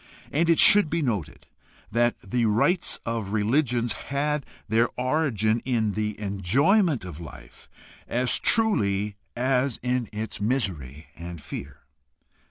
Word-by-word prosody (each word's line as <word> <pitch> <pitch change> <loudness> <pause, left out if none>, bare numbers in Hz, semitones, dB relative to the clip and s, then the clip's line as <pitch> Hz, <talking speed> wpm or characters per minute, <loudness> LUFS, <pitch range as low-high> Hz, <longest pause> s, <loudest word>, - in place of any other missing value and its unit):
And 165 +4 +1
it 165 - +4
should 205 -6 +7
be 165 0 -1
noted 105 - -3 0.5
that 120 +2 +2
the 115 +4 -1
rites 170 - +1
of 115 -3 -3
religions 120 +1 +1 0.2
had 145 +1 -1 0.2
their 115 +3 +2
origin 125 -5 +1
in 115 -5 0
the 105 0 -3
enjoyment 125 - +1
of 85 -3 -8
life 80 -5 -12 0.4
as 125 +1 +1
truly 105 - +1 0.2
as 130 0 0
in 125 -2 -1
its 110 -1 -6
misery 90 - -2
and 85 +1 -8
fear. 70 -1 -8
115 Hz, 125 wpm, -25 LUFS, 100-135 Hz, 0.5 s, should